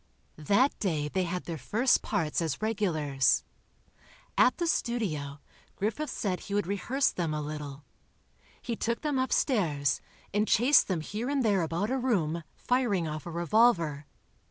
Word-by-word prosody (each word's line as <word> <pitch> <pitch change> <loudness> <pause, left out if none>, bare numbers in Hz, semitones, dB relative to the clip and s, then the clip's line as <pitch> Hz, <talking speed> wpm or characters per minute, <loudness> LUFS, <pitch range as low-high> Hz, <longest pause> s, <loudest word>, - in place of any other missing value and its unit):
That 255 +8 +4
day 155 -7 -1
they 185 +3 0
had 180 +1 -3
their 165 -3 -5
first 225 - +2
parts 160 0 -1
as 165 -2 -2
regulars. 160 -12 +1 0.9
At - - +4
the 345 - -1
studio, 180 - -1 0.4
Griffith 225 +9 -2
said 185 -7 -2
he 200 - -5
would 205 - +1
rehearse 240 +9 0
them 165 -4 -2
a - - -2
little. 145 -1 -6 0.8
He 235 - -4
took 235 +1 -2
them 295 -4 0
upstairs, 165 - +1 0.3
and 210 +1 +1
chased 255 +7 +5
them 180 -5 -1
here 215 - -4
and 280 -3 +1
there 200 -4 +3
about 170 +7 -1
a 265 - 0
room, 170 -10 0
firing 235 -9 0
off 155 +1 -5
a - - -5
revolver. 170 -5 +2
190 Hz, 155 wpm, -29 LUFS, 155-235 Hz, 0.9 s, chased